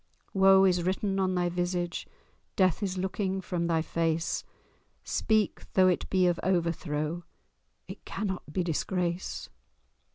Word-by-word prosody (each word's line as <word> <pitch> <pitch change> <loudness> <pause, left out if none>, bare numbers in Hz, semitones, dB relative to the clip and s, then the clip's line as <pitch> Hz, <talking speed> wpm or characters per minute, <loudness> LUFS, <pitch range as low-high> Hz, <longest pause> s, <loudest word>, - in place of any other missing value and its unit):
Woe 195 0 +6
is 180 -2 +3
written 195 +2 0
on 185 -1 +1
thy 175 0 +1
visage, 175 0 -2 0.5
Death 185 0 +3
is 190 -2 -2
looking 190 +1 -1
from 175 -2 -2
thy 165 -2 +1
face; 165 0 -1 0.6
Speak! 215 -2 0
though 185 -1 +5
it 180 - -1
be 185 -1 +3
of 175 -1 +2
overthrow— 170 -2 -1 0.6
It - - -9
cannot 190 -6 -4
be 180 +4 0
disgrace!" 175 +1 -2
180 Hz, 130 wpm, -29 LUFS, 170-190 Hz, 0.6 s, Woe